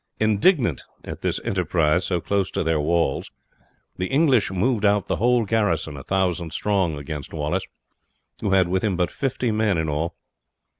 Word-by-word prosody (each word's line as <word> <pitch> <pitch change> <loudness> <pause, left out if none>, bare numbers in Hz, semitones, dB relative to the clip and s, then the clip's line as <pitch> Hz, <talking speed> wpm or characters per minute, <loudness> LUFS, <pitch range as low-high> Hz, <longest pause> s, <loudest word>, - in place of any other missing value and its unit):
Indignant 110 - +2 0.2
at - - -7
this - - 0
enterprise 85 -2 +1
so 90 -2 0
close 100 +2 -1
to - - -2
their 80 -1 +1
walls 85 -1 0 0.7
the 90 - -2
English 135 - +3
moved 105 +4 0
out 100 -2 +3
the - - -1
whole 120 +1 +2
garrison, 100 -8 0
1000 85 +3 -1
strong, 95 -7 0
against 70 -1 -7
Wallace, 75 -1 -2 0.7
who 105 - -2
had 95 -2 +4
with 95 +1 -1
him 100 -5 0
but 90 -1 0
fifty 130 -3 -1
men 105 -4 +1
in 80 -1 -1
all. 75 +3 -2
95 Hz, 160 wpm, -23 LUFS, 80-105 Hz, 0.7 s, had